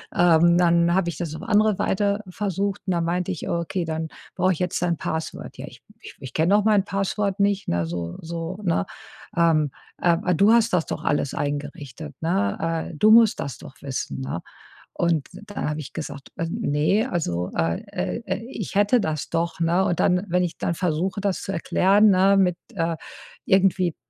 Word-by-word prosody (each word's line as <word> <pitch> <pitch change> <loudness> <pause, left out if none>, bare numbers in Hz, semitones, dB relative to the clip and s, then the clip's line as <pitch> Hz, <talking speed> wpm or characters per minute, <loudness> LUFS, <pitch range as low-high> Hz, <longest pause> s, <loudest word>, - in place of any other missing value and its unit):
ähm, 170 0 +5
dann 170 -1 +4
habe 185 -2 +2
ich 170 - -6
das 170 -4 -4
auf 160 - -7
andere 215 -2 +2
Weite 200 0 +1
versucht 200 +1 -2
und 190 - -1
dann 170 -1 0
meinte 180 +2 -1
ich: 175 - -5
„Oh, 170 -2 0
okay, 175 +2 -2
dann 160 0 -3 0.3
brauche 185 +1 +2
ich 165 - -7
jetzt 180 -1 -1
ein 175 -1 +1
Password.“ 160 0 -5
„Ja, - - -6
ich - - -13 0.2
ich - - -11
ich 130 -2 -9
kenne 165 +5 +2
doch 210 0 +4
mein 210 -3 +4
Passwort 195 0 -1
nicht,“ 200 0 +1
ne, 85 -1 0
so 85 0 -4
so, 165 +3 -5
ne? 165 - +1 0.5
„Ähm, 160 -4 +3 0.3
äh, 175 - +2
aber 170 +1 +2
du 200 +7 +5
hast 230 -1 +4
das 175 -3 +2
doch - - -5
alles 145 -2 0
eingerichtet,“ 145 0 -5
ne? 160 - -1
„Äh, - - -8
du 210 +8 +4
musst 225 -1 +6
das 135 -5 -4
doch - - -12
wissen,“ 135 -1 -4
ne? 110 -10 -4 0.5
Und 165 -5 0
dann 205 -2 -5
habe 150 +1 -3
ich 145 - -9
gesagt: 145 -3 -7
„Als 165 - -2
ne, 195 - +1
also, 90 - -1
äh, 80 0 0
äh, 90 +1 -3
äh, 225 - -3
ich 215 -7 -6
hätte 205 +5 +4
das 155 -8 -2
doch,“ 170 +1 -2
ne? 170 +3 +2
Und 175 - 0
dann, 180 +1 +2
wenn 180 +1 +2
ich 175 -2 -2
dann - - -1
versuche, 180 +3 -1
das 200 -2 -1
zu 195 - -4
erklären, 195 +4 +3
ne, 195 +1 +4
mit, 180 -3 +3 0.2
äh 165 -3 -1 0.5
irgendwie 190 -3 +3
170 Hz, 200 wpm, -24 LUFS, 155-195 Hz, 0.5 s, musst